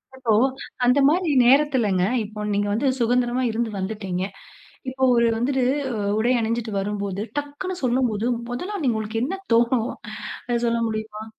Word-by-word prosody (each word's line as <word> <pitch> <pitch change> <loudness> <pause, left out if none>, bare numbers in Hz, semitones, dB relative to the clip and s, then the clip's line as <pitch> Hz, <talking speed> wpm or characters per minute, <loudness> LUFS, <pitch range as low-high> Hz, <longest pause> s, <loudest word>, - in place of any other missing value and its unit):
அப்போ 255 -4 -1 0.5
அந்தமாரி 285 +7 +3 0.2
நேரத்துலங்க. 255 -8 +3 0.2
இப்போ 210 0 -9
நீங்க 205 0 0
வந்து 260 +6 0
சுதந்திரமா 245 +1 +1
இருந்து 230 +1 -1
வந்துட்டீங்க. 190 -2 -3 0.7
இப்போ 260 0 -5
ஒரு 235 0 +4
வந்துட்டு 255 +3 0 0.3
அ - - -3 0.2
உடை 240 +3 +2
அணிஞ்சிட்டு 230 0 -2
வரும்போது, 200 -1 -3 0.2
டக்குனு 290 +6 -4
சொல்லும்போது 240 -3 +1 0.2
முதலா 365 +12 -4
நீங்க 230 -4 +1
உங்களுக்கு 220 +1 -3
என்ன 380 +8 -3 0.2
தோணும் 235 0 +2 0.6
அத 240 - +1
சொல்ல 235 0 +1
முடியுமா? 215 0 -5
235 Hz, 135 wpm, -23 LUFS, 215-260 Hz, 0.7 s, ஒரு